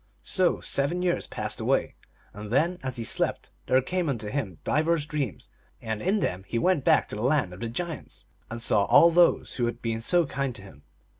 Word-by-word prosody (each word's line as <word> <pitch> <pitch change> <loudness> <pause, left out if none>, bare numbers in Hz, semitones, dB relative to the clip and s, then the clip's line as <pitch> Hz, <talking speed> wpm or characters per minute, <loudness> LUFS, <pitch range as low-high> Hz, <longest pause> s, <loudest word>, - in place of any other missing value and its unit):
So 185 -2 +2
seven 150 +6 -1
years 175 -1 0
passed - - -4
away, - - 0 0.4
and 105 0 -8
then, 170 +8 +1
as 130 -1 -4
he 115 - -3
slept, 110 - -2 0.2
there 130 - +4
came 180 +2 -1
unto 110 -6 -3
him 105 - -3
divers 160 0 +1
dreams, 145 - -4 0.3
and 110 -1 -4
in 200 +2 +1
them 90 +1 -2
he 115 - -2
went 170 +3 +2
back - - +4
to - - -5
the 105 - -5
Land 125 -7 +1
of 90 - -11
the 115 - -3
Giants, 165 +6 -6 0.2
and 115 - -5
saw 105 -3 +2
all 170 - +6
those 175 +1 +3
who 120 - +1
had 120 0 -4
been 115 -1 -3
so 175 +7 +3
kind 135 -3 -3
to 100 - -7
him. 75 -7 -14
130 Hz, 210 wpm, -26 LUFS, 115-170 Hz, 0.4 s, all